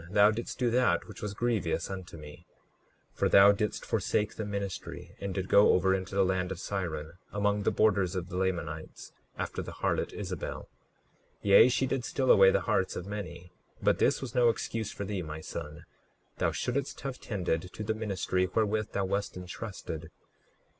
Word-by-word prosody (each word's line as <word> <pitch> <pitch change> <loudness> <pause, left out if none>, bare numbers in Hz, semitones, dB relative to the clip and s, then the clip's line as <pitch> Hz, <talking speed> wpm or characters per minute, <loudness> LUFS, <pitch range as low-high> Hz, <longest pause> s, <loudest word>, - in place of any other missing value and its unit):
Thou 105 +2 +6
didst 115 +2 -5
do 120 -2 +1
that 120 -8 +2
which - - -10
was 105 -1 -4
grievous 115 -4 0
unto 95 -3 -7
me; 75 -1 -12 0.7
for - - +1
thou 100 +1 +8
didst 105 +1 -2
forsake 105 0 0
the 110 - -4
ministry, 100 -2 -5
and 100 -1 -3
did 95 -1 -3
go 100 - +6
over 95 +1 +3
into 95 +1 -3
the 100 -1 +4
land 90 0 0
of 95 - -4
Siron, 85 -4 -4
among 105 0 +1
the - - +2
borders 100 -4 +2
of 90 -2 -3
the 90 - -7
Lamanites, 85 -4 -3 0.2
after - - -3
the - - -7
harlot - - -1
Isabel. - - -5
39:4 - - -14 0.8
Yea, 100 +5 +7
she 130 +2 +1
did 130 -1 -1
steal 130 +2 +2
away 95 -1 +8
the - - +2
hearts - - 0
of 90 - -5
many; 90 -4 -7 0.3
but - - +2
this - - +2
was - - -6
no 120 -2 +5
excuse 110 -1 -2
for 100 - -5
thee, 100 -1 -3
my 75 -2 -6
son. 75 -1 -7 0.6
Thou - - +2
shouldst 130 +2 -2
have 135 -2 -5
tended 90 -4 -2
to 110 - -6
the 110 +1 0
ministry 95 -4 -1
wherewith 110 -1 0
thou 100 - 0
wast 100 0 -2
entrusted. 90 -3 -6
100 Hz, 185 wpm, -30 LUFS, 90-110 Hz, 0.8 s, thou